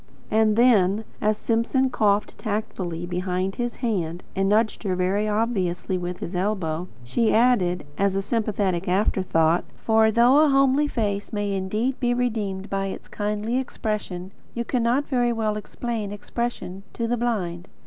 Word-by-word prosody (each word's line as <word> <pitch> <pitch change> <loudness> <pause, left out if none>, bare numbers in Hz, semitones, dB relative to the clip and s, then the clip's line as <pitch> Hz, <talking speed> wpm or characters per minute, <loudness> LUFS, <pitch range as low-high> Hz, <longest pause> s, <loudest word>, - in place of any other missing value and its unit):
And 215 -1 +3
then, 215 -4 +4 0.2
as 215 0 +2
Simpson 245 +4 +1
coughed 205 -2 +1
tactfully 190 -6 -3
behind 180 +1 -2
his 240 0 -2
hand, 175 -6 -2
and 195 0 +1
nudged 215 +1 +2
her 190 -4 -1
very 190 +4 +1
obviously 205 -5 0
with 180 0 -3
his 175 - -5
elbow, 180 -3 -1 0.2
she 220 - +1
added, 195 -9 +3
as 200 -1 +2
a 195 - +1
sympathetic 200 -5 -1
after 190 +1 +2
thought: 165 -1 +2
"For, 220 0 +3
though 240 +5 +5
a 310 -1 +5
homey 275 +1 +4
face 205 -6 -2
may 205 -1 -1
indeed 210 +7 -1
be 245 -1 +1
redeemed 210 -6 -2
by 195 0 -1
its 190 - -7
kindly 210 +4 -1
expression, 210 -7 -4 0.2
you 235 0 -2
cannot 250 +3 +1
very 245 -3 +1
well 220 -2 0
explain 215 0 -4
expression 205 -2 -4
to 230 - -2
the 240 - +1
blind." 195 -7 -2
210 Hz, 155 wpm, -24 LUFS, 185-235 Hz, 0.2 s, though